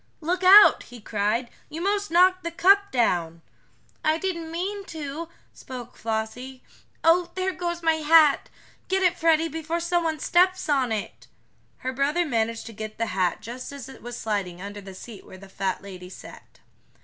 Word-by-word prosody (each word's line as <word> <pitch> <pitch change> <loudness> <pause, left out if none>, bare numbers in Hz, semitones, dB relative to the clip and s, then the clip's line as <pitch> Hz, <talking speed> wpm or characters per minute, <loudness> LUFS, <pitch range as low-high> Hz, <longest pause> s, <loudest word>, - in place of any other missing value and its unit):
"Look 350 +3 -2
out!" 395 +3 +8
he 245 - -12
cried. 215 +3 -1 0.2
"You 315 +1 -6
'mos 405 +3 -1
knocked 370 +2 +4
the 335 - -2
cup 395 +4 +4
down." 170 -9 0 0.6
"I 310 +1 +2
didn't 335 -2 -4
mean 385 +5 -4
to," 315 -1 -6 0.2
spoke 250 -2 -9
Flossie. 230 +4 -5 0.4
"Oh, 340 +2 +4
there 375 0 -1
goes 345 -1 -4
my 325 -1 +3
hat! 310 -2 +4 0.4
Get 380 0 0
it, 355 -1 +3
Freddie, 330 -1 +2
before 325 +1 -3
someone 340 -2 0
steps 370 +4 +2
on 270 -5 +1
it!" 215 -2 -5 0.6
Her 260 - -1
brother 295 +6 +1
managed 230 -4 -1
to 230 - -9
get 215 0 -7
the 230 - 0
hat 185 -2 0
just 245 +4 -7
as 280 -3 -8
it 265 - -13
was 240 0 -7
sliding 195 -5 -3
under 205 +2 -8
the 195 -1 -11
seat 215 +1 -11
where 190 - -13
the 195 +1 -13
fat 190 0 -3
lady 180 -2 -10
sat. - - -14
295 Hz, 175 wpm, -25 LUFS, 220-345 Hz, 0.6 s, out